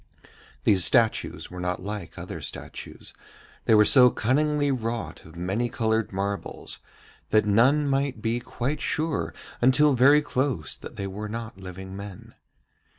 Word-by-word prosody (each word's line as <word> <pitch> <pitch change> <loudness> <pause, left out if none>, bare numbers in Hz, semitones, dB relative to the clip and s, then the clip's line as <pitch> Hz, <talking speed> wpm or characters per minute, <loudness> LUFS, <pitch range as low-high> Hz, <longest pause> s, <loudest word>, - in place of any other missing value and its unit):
These 95 -4 +5
statues 115 +1 +1
were 90 - -7
not 90 0 -2
like 105 +1 -6
other - - -7
statues, - - -8 0.5
they 110 - +5
were 105 0 +6
so 125 +1 +7
cunningly 145 +5 +1
wrought 115 -2 -4
of 80 +1 -14
many 95 +8 -1
coloured 110 -3 0
marbles 100 +1 -4 0.5
that 110 -1 +3
none 130 +8 +4
might 135 -3 0
be 115 +2 -1
quite 125 +4 -3
sure 155 -1 -1 0.3
until 135 +4 +5
very 140 +4 +5
close 125 - -1
that - - -11
they 100 - -4
were 105 +2 -5
not 115 -2 -6
living 95 0 -8
men. 100 -1 -9
115 Hz, 145 wpm, -26 LUFS, 100-135 Hz, 0.5 s, so